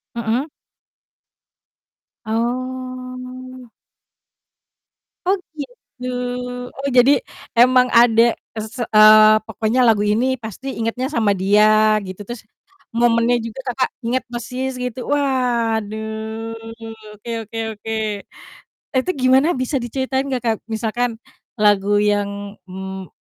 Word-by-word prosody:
Mhm. 235 +3 -1 1.8
Oh. 255 +1 -4 1.6
Oh 390 +2 +3 0.2
gitu, 250 -2 -9 0.7
oh 275 +1 -3
jadi 250 +3 +7 0.5
emang 250 +1 +6
ada 230 -1 +5 0.3
ke 225 - -5
s 225 - -13 0.2
eee, 215 0 +8
pokoknya 220 +2 -1
lagu 225 -4 +4
ini 245 +5 +1
pasti 225 +2 -8
ingetnya 230 +3 -1
sama 225 -9 +1
dia 215 +3 +4
gitu, 185 +1 -8
terus 240 -1 -6 0.5
momennya 235 0 +3
juga 230 +3 -7
Kakak 255 +1 0 0.2
inget 250 +3 0
persis 250 +2 -3
gitu. 250 0 -4
Waduh, 225 -4 -1 0.6
oke 215 - -11
oke 225 +1 -9 0.2
oke, 220 +1 -6 1.1
itu 260 - 0
gimana 260 +4 +5
bisa 255 +3 -1
diceritain 265 +2 -2
gak 250 - -3
Kak? 225 -1 +2 0.2
Misalkan 235 +2 -1 0.5
lagu 205 0 +4
yang, 205 -1 0 0.4
mmm, 190 0 -7
235 Hz, 105 wpm, -20 LUFS, 215-255 Hz, 1.8 s, eee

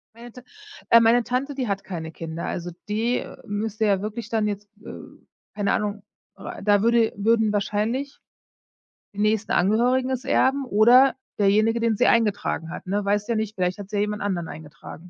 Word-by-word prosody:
Meine 240 0 -12
Ta 250 - -12 0.5
äh, 230 - +8
meine 230 +1 +4
Tante, 265 +4 -2
die 255 -4 -2
hat 195 -1 -2
keine 160 -4 -6
Kinder. 165 +1 -6
Also, 175 0 -4 0.2
die 225 +4 -1 0.2
müsste 215 +1 -2
ja 200 -2 +2
wirklich 215 +2 -5
dann 220 -2 0
jetzt, 205 0 -5 0.2
äh - - -7 0.6
keine 205 -1 -1
Ahnung, 205 -1 -2 0.3
äh, - - -8
da 205 -1 +3
würde 230 0 +3
würden 220 +1 +2
wahrscheinlich 215 +7 -2 1.0
die 205 - -13
nächsten 215 0 +1
Angehörigen 245 +7 +2
es 260 0 -3
erben 275 0 +2
oder 245 +5 +5 0.2
derjenige, 215 +3 +3
den 230 -2 +1
sie 250 - +3
eingetragen 205 -7 +1
hat, - - -8
ne? 205 +2 -1
Weißt 205 +2 0
ja - - +2
nicht, 215 -1 -2
vielleicht 180 +1 -1
hat 200 -1 -8
sie 210 - -3
ja - - +1
jemand 210 0 -3
anderen 180 -5 -2
eingetragen. 150 -2 -10
215 Hz, 185 wpm, -24 LUFS, 200-235 Hz, 1.0 s, äh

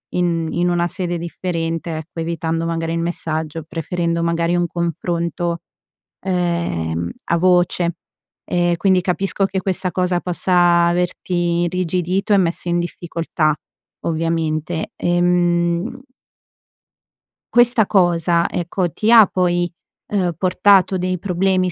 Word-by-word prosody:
in 170 -2 0
in 175 +1 +1
una 175 0 +1
sede 175 -1 -3
differente, 165 -1 -3
ecco, 160 +1 -7
evitando 165 0 -2
magari 165 0 -2
il 165 - -1
messaggio, 160 -2 -3
preferendo 170 +1 -2
magari 170 +1 +1
un 175 0 +1
confronto, 170 0 -2 0.6
ehm, 170 - -1
a 170 - +1
voce. 175 -1 +2 0.5
E 175 -1 +2
quindi 185 0 +3
capisco 195 +2 0
che 195 0 -2
questa 185 -1 -1
cosa 180 0 0
possa 175 -1 +3
averti 175 0 0
irrigidito 180 +3 0
e - - +6
messo 175 -1 0
in 175 0 +1
difficoltà, 165 -2 -1 0.5
ovviamente. 160 0 -1
Ehm 175 +5 +1 1.5
questa 240 -3 +5
cosa, 170 -3 +2
ecco, 175 0 -2
ti 220 +7 0
ha 225 -3 +9
poi, 175 -2 0 0.4
ehm, 185 -4 0
portato 190 +1 +3
dei 185 0 -1
problemi 185 0 0
175 Hz, 115 wpm, -19 LUFS, 170-180 Hz, 1.5 s, ha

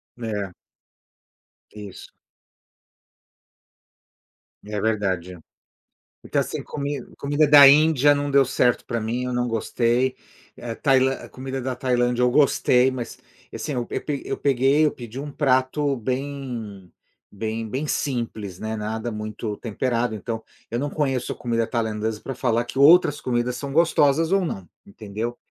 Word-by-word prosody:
Né. 105 -5 -4 1.2
Isso. 105 -3 -10 2.5
É 105 0 -4
verdade. 95 -5 -1 0.8
Porque, - - -4
assim, - - -1
comi 145 -1 -4
comida 145 +2 +1
da 145 -1 +9
Índia 145 0 +5
não 145 0 -2
deu 140 0 +5
certo 125 -1 +1
pra 115 - -2
mim, 115 +3 -2
eu 125 0 -3
não 125 0 0
gostei. 120 +3 0 0.4
É, 115 -1 -6
Tailan 135 -1 +3
a - - -9
comida 130 0 -5
da 130 0 -3
Tailândia 125 -1 +1
eu 125 - +4
gostei, 130 -2 +4
mas, 125 -2 -6 0.4
assim, 150 - -4
eu 120 -2 -2
pe 145 -2 -4
eu - - -3
peguei, 140 +3 +3
eu 150 - +2
pedi 120 0 -10
um 145 +1 -6
prato 135 +1 +1
bem 125 -6 -5 0.4
bem 110 +1 -4
bem 135 +6 -3
simples, 115 -10 -3
né. 110 0 -3
Nada 110 +2 -3
muito 105 0 -5
temperado, 120 0 -1
então, 115 +1 -5 0.3
eu 120 - -2
não 145 +2 -2
conheço 135 -5 -1
a - - -4
comida 115 -1 -1
tailandesa 110 -2 -2
pra 135 - -6
falar 120 -1 0
que 135 - -8
outras 150 0 +6
comidas 125 0 -1
são 140 +1 -5
gostosas 160 0 +3
ou 195 -1 +3
não, 95 - -5 0.2
entendeu. 110 +4 -6
125 Hz, 145 wpm, -23 LUFS, 110-140 Hz, 2.5 s, da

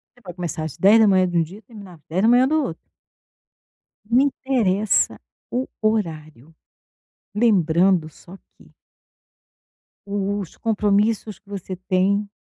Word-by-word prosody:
Você - - -22
vai 180 - -9
começar 170 -3 -5
às 155 - -6
10h 200 -2 +5
de 175 -1 -2
um - - +4
dia 185 +7 -11
e - - -21
terminar 200 -4 -13
às 155 - -23
10h 230 +9 +4
do 310 +1 +1
outro. 165 -11 -5 1.3
Não 240 - +4
interessa 235 -8 +1 0.3
o 255 +2 -2
horário, 160 - -3 0.8
lembrando 185 -5 +2
só 180 +5 -15 0.2
que - - -21 1.3
o 200 0 -2
os 190 -5 -8
compromissos 210 -1 0
que 200 - -35
você 190 -2 -6
tem 190 +2 0
200 Hz, 130 wpm, -21 LUFS, 175-220 Hz, 1.3 s, 10h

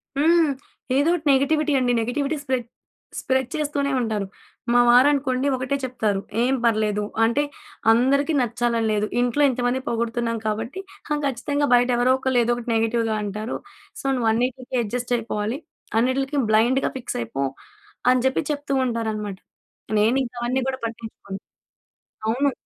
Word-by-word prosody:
హ్మ్. 320 +1 +4 0.5
ఏదో 290 +4 +3
ఒకటి 320 -3 -2
నెగటివిటీ 300 +3 +2
అండి. 250 -1 +1
నెగటివిటీ 280 +6 -1
స్ప్రెడ్ 260 -4 -2 0.5
స్ప్రెడ్ 260 -1 0
చేస్తూనే 290 -2 -1
ఉంటారు. 220 -4 -1 0.5
మా 245 - +6
వారనుకోండి 260 +1 +4
ఒకటే 260 +2 -2
చెప్తారు, 220 -6 -1 0.2
"ఏం 255 +2 +2
పర్లేదు. 215 -2 +1 0.2
అంటే 235 +6 +2 0.5
అందరికి 275 +6 +3
నచ్చాలని 235 -1 0
లేదు. 210 0 +1 0.2
ఇంట్లో 245 +4 +2
ఇంతమంది 245 0 0
పొగుడుతున్నాం 230 0 -1
కాబట్టి 225 - -3 0.3
హా, - - +1
ఖచ్చితంగా 285 +2 0
బయట 245 +1 +4
ఎవరో 250 +2 +4
ఒకళ్ళు 260 -1 +1
ఏదో 235 - +1
ఒకటి 240 0 -6
నెగెటివ్‌గా 225 0 +1
అంటారు. 210 +3 -4 0.5
సో, - - -17
నువ్వు 235 -3 +1
అన్నిటికి 250 +2 -1
అడ్జస్ట్ 245 +3 -3
అయిపోవాలి. 225 +2 -3 0.4
అన్నిటిలకి 270 +4 0
బ్లైండ్‌గా 240 +5 +3
ఫిక్స్ 255 - -5
అయిపో" 135 +4 -2 0.7
అని 255 -1 +2
చెప్పి 265 +4 +1
చెప్తూ 290 -1 -3
ఉంటారనమాట. 220 -4 -3 0.6
నేనింకా 245 +3 +1
అవన్నీ 255 +2 0
కూడా 260 -1 -2
పట్టించుకోను. 225 -4 -8 0.9
అవును. 270 +6 +2
245 Hz, 135 wpm, -23 LUFS, 225-270 Hz, 0.9 s, మా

